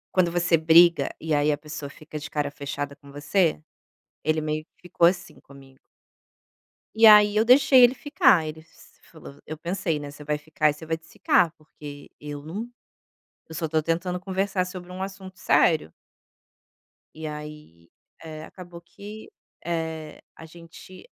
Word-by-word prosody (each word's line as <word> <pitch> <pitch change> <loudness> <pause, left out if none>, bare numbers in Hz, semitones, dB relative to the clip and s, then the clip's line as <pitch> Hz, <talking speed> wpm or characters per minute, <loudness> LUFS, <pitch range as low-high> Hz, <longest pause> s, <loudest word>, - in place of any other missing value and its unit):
Quando 185 -2 +3
você 170 -1 +2
briga 165 +2 +5
e 160 -1 -2
aí 150 +1 +2
a - - -3
pessoa 150 -1 -8
fica 155 +1 -9
de 150 - -8
cara 145 -1 -2
fechada 140 0 -6
com 140 -1 -16
você, 150 +3 0 0.6
ele 155 0 0
meio 155 0 -3
que - - -67
ficou 175 -1 +1
assim 175 0 -3
comigo. 135 -1 -17 1.2
E 225 +1 +5
aí 210 -1 +7
eu 220 - +3
deixei 260 +1 +6
ele 245 +1 +6
ficar, 265 - +3
ele 155 +1 -7
se 165 - -22
falou 70 0 -13
eu 155 - -7
pensei, 170 0 -2
né, 145 -1 -8
"Você 145 +1 -12
vai 150 0 -1
ficar 155 0 0
e 150 +2 -10
vai 160 0 -2
desficar, 165 0 +1
porque 145 -2 -12
eu 145 -1 -7
não 200 +10 -6 0.8
eu 160 - -10
só 160 0 -2
tô 155 0 0
tentando 175 +3 -2
conversar 190 0 -1
sobre 180 -1 -9
um 185 - -8
assunto 190 -1 -8
sério". 155 - +2 1.2
E 160 0 -7
aí, 150 - -10 0.3
eh, 155 -1 -8
acabou 175 -2 -12
que, 205 +5 -12 0.4
eh, 160 -2 -4
a 165 - -12
gente 170 +3 -14
160 Hz, 160 wpm, -25 LUFS, 150-185 Hz, 1.2 s, aí